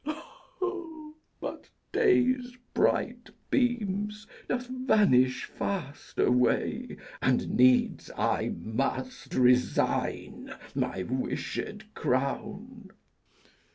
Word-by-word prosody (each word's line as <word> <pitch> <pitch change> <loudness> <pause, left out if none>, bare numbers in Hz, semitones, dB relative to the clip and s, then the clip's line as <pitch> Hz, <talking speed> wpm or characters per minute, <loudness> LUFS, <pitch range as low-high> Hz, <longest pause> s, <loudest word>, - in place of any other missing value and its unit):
But - - -6 0.2
day's 255 - +3 0.2
bright - - +1 0.2
beams 210 -4 0 0.2
doth 250 0 -1
vanish 210 - +3
fast 160 -8 -5
away, 125 0 +2 0.2
And - - +2
needs 125 0 +4
I - - 0
must 135 - -3
resign 125 0 +1 0.2
my 95 - -1
wished 210 - -4
crown. 205 - -2
205 Hz, 70 wpm, -29 LUFS, -, 0.2 s, needs